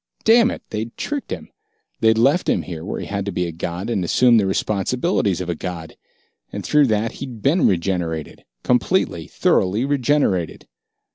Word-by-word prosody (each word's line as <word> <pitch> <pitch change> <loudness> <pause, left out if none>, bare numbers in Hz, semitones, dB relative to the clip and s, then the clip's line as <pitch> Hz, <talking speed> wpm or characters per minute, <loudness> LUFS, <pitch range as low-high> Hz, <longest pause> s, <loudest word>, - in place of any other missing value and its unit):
Damn 230 +2 +5
it, - - -6
they'd 110 +2 -5
tricked 290 -2 -4
him! - - -6 0.5
They'd 110 0 +3
left 140 +10 +3
him - - +1
here 80 -3 -7
where 100 - -4
he - - -5
had 100 0 -3
to - - -1
be 90 0 -1
a 85 - -4
god 85 +4 -5
and 110 -6 -1
assume 120 +7 +4
the 100 -3 +2
responsibilities 100 - 0
of 90 - -4
a 85 - -1
god. 85 -1 -7 0.6
And - - -6
through 150 -2 +4
that, 110 0 0
he'd 125 -6 -7
been 165 +6 +3
regenerated 85 -3 -2 0.2
completely, 125 - +1
thoroughly 105 +7 +1
regenerated! 140 - 0
105 Hz, 170 wpm, -21 LUFS, 90-130 Hz, 0.6 s, Damn